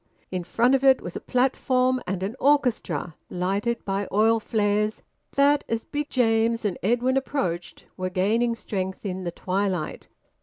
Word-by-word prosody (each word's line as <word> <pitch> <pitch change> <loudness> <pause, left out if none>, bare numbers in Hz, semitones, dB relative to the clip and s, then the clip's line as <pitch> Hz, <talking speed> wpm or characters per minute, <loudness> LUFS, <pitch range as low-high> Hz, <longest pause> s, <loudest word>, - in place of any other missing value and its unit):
In 185 -1 -2
front 235 +8 +2
of 270 0 +2
it 265 -1 +6
was 175 - -8
a - - -3
platform, 255 0 +1
and 185 0 -2
an 205 +5 -3
orchestra, 260 - +1 0.2
lighted 200 +6 -1
by 195 0 -1
oil 225 +2 +4
flares 210 -1 0 0.3
that, 285 +1 +4
as 230 0 -2
Big 295 +1 -3
James 230 -2 +2
and 195 -4 0
Edwin 245 +5 +2
approached, 185 -11 -3
were 185 0 -2
gaining 220 +6 +1
strength 190 -3 -4
in 185 -1 -3
the 175 - -2
twilight. 185 -2 -2
220 Hz, 155 wpm, -25 LUFS, 190-255 Hz, 0.3 s, it